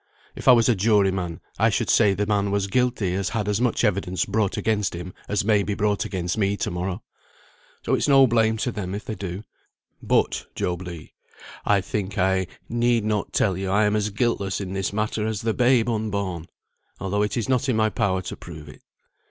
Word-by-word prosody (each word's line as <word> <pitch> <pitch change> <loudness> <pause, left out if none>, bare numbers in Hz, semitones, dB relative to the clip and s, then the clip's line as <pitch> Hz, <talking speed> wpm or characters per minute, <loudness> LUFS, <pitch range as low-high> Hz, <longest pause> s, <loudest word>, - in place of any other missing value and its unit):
If - - -8
I - - +10
was 115 -2 +4
a 120 - +5
jury 100 -1 +3
man, 90 -4 -4 0.2
I - - +4
should - - 0
say 100 -2 +4
the 105 +2 0
man 100 -1 +1
was 100 0 0
guilty 115 -3 0
as 95 +1 -1
had 110 -3 -2
as 105 +2 0
much 125 -2 +1
evidence 95 -3 0
brought 105 -1 0
against 105 -5 0
him 90 +1 -7 0.2
as 100 -1 0
may 105 -2 +4
be 100 0 -2
brought 105 0 0
against 90 +2 -3
me 100 0 +1
to - - -2
morrow. 90 +1 -3 0.8
So - - 0
it's - - +1
no 135 -2 +7
blame 110 -2 +2
to 125 - -1
them 100 -3 -4
if 105 - -6
they - - -4
do. 95 -1 -6 0.6
But, - - +1
Job 90 0 -2
Legh, 85 -3 -9 0.6
I 100 -2 +4
think 100 0 -4
I 95 0 +2 0.2
need 120 -1 +1
not 105 -2 -1
tell 95 -4 +1
you 95 +1 -3
I 105 +3 +3
am 105 +1 +2
as 105 0 0
guiltless 100 -2 -1
in 95 -2 -5
this 95 -1 -1
matter 105 +1 -1
as 110 -1 -2
the 115 -1 +1
babe 120 -1 +3
unborn, 100 -7 -2 0.5
although 100 +2 -1
it 105 +1 -1
is 115 - -1
not 130 +1 +1
in 125 - +2
my 110 0 +2
power 95 -2 0
to - - -6
prove 80 -3 -10
it. - - -14
100 Hz, 215 wpm, -24 LUFS, 95-110 Hz, 0.8 s, I